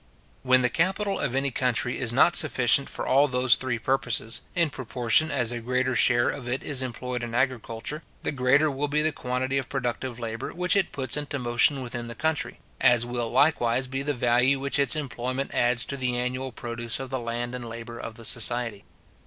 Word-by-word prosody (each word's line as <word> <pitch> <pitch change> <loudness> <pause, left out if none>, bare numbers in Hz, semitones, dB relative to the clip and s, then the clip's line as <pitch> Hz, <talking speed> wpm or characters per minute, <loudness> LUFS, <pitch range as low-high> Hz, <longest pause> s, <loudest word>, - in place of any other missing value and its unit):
When 130 -1 +3
the 125 - +3
capital 195 +4 0
of 125 - -1
any 135 0 0
country 125 -1 0
is 120 -3 +1
not 145 +7 +4
sufficient 135 -2 +4
for - - -2
all 140 +2 +4
those 125 -1 +4
three 130 -3 -1
purposes, 120 -2 -1
in 170 -4 +2
proportion 125 +4 +1
as 125 -6 0
a 120 - -4
greater 125 +2 -1
share 120 0 +4
of 125 -4 -4
it 130 +2 -2
is 135 -3 -2
employed 125 0 -4
in 120 -1 -5
agriculture, 125 +2 -2 0.2
the - - -1
greater 140 +3 +2
will 140 +2 -2
be 150 +1 +1
the 155 - +2
quantity 130 0 -2
of 130 - -6
productive 125 -2 -3
labour 115 -1 -5
which 180 +2 +1
it 195 -3 +1
puts 130 0 -1
into 145 -1 -3
motion 125 +2 +3
within 120 -1 -5
the 115 - -8
country; 160 +4 -2 0.2
as 120 -3 +4
will 120 -1 -3
likewise 130 -2 +3
be 135 +1 -3
the 145 +1 -2
value 125 +3 +2
which 140 +1 -1
its 140 +3 +2
employment 130 -2 -4
adds 120 0 +2
to 140 - -4
the 125 -2 -1
annual 130 +2 -3
produce 115 0 -3
of 135 -1 -7
the 130 - -2
land 120 +1 -4
and 120 -2 -6
labour 115 0 -8
of 115 - -7
the 115 0 -8
society. 115 -3 +1
125 Hz, 200 wpm, -26 LUFS, 120-135 Hz, 0.2 s, not